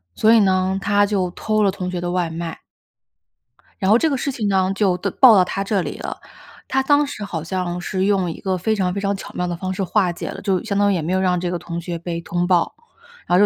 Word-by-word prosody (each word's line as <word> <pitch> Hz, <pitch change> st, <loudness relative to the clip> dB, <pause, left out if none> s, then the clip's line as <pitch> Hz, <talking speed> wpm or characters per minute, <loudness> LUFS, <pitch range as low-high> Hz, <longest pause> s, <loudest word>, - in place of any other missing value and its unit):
所 220 Hz, +1 st, +4 dB
以 230 Hz, -, +6 dB
呢， 190 Hz, -1 st, +2 dB
他 205 Hz, 0 st, +3 dB
就 195 Hz, -3 st, 0 dB
偷 215 Hz, +4 st, -1 dB
了 200 Hz, -, +4 dB
同 185 Hz, -2 st, -5 dB
学 180 Hz, -1 st, -3 dB
的 175 Hz, -, -2 dB
外 180 Hz, -2 st, 0 dB
卖。 165 Hz, 0 st, -5 dB, 1.2 s
然 190 Hz, -3 st, 0 dB
后 220 Hz, -, +7 dB
这 320 Hz, +6 st, +2 dB
个 275 Hz, -, 0 dB
事 280 Hz, -, -2 dB
情 225 Hz, -5 st, -2 dB
呢， 190 Hz, -1 st, +2 dB
就 195 Hz, -3 st, +2 dB
的 200 Hz, -, -2 dB
报 245 Hz, +4 st, +7 dB
到 185 Hz, -, +6 dB
她 195 Hz, +2 st, -3 dB
这 200 Hz, -1 st, 0 dB
里 -, -, -5 dB
了， -, -, -5 dB, 0.5 s
她 265 Hz, +1 st, +1 dB
当 290 Hz, +2 st, +4 dB
时 215 Hz, -6 st, -6 dB
好 165 Hz, -6 st, -4 dB
像 180 Hz, 0 st, -3 dB
是 185 Hz, +2 st, -2 dB
用 195 Hz, -3 st, +1 dB
一 -, -, -9 dB
个 190 Hz, -1 st, -1 dB
非 220 Hz, +5 st, 0 dB
常 185 Hz, -3 st, 0 dB
非 200 Hz, -, -3 dB
常 200 Hz, 0 st, 0 dB
巧 195 Hz, -, -9 dB
妙 180 Hz, -, -2 dB
的 175 Hz, -, -2 dB
方 185 Hz, +2 st, -4 dB
式 195 Hz, -, -2 dB
化 190 Hz, -1 st, +1 dB
解 170 Hz, -, -6 dB
了， -, -, -7 dB
就 190 Hz, -3 st, 0 dB
相 200 Hz, -3 st, -2 dB
当 205 Hz, 0 st, +3 dB
于 -, -, +1 dB
也 170 Hz, -, -1 dB
没 165 Hz, +4 st, -2 dB
有 190 Hz, -, +2 dB
让 180 Hz, -1 st, +1 dB
这 175 Hz, 0 st, -2 dB
个 175 Hz, -, -2 dB
同 170 Hz, 0 st, -6 dB
学 170 Hz, 0 st, -5 dB
被 170 Hz, 0 st, -4 dB
通 175 Hz, +1 st, -1 dB
报， 175 Hz, -2 st, +2 dB, 0.5 s
然 -, -, -45 dB
后 175 Hz, -, +4 dB
这 -, -, +5 dB
190 Hz, 295 characters per minute, -21 LUFS, 175-205 Hz, 1.2 s, 后